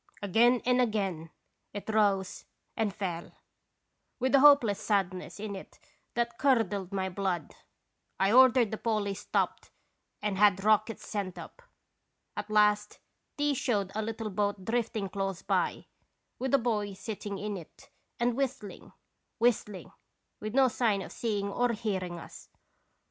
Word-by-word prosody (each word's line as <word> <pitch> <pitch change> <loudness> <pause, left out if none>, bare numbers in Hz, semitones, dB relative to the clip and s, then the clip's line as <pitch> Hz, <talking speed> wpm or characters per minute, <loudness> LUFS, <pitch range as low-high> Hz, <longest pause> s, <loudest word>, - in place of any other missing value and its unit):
" - - -25
Again 235 +5 +4
and 250 0 +3
again 195 -8 -1 0.4
it 205 - -7
rose 205 -3 +1 0.3
and 220 -2 0
fell, 180 -4 -5 0.8
with 260 +1 0
a 275 - +7
hopeless 270 -8 +6
sadness 190 -2 -1
in 205 -1 -4
it 190 - -11 0.4
that 235 0 -1
curdled 210 -8 +1
my 190 -1 -1
blood. 185 -4 -2 0.7
I 195 +1 +3
ordered 250 -2 +6
the 220 - -4
Polly 215 -3 0
stopped 205 - -2 0.5
and 205 -2 -2
had 200 -2 +4
rockets 215 +1 +2
sent 200 -4 -4
up. - - -10 0.7
At 210 - -5
last 210 0 +3 0.4
these 290 -2 +1
showed 205 -8 0
a 220 - -1
little 225 0 -4
boat 200 -1 -1
drifting 225 -3 -1
close 195 -1 -3
by, - - 0 0.5
with 265 +1 +2
a - - +6
boy 215 -5 -1
sitting 205 0 -6
in 205 +1 -4
it 170 -5 -12 0.3
and 240 0 +2
whistling, 260 -6 -4 0.4
whistling, 225 -5 0 0.5
with 215 +2 -5
no 270 -1 +6
sign 220 -5 +1
of - - -10
seeing 205 -4 -2
or 240 +4 0
hearing 190 -6 -3
us. - - -11
210 Hz, 145 wpm, -30 LUFS, 195-235 Hz, 0.8 s, a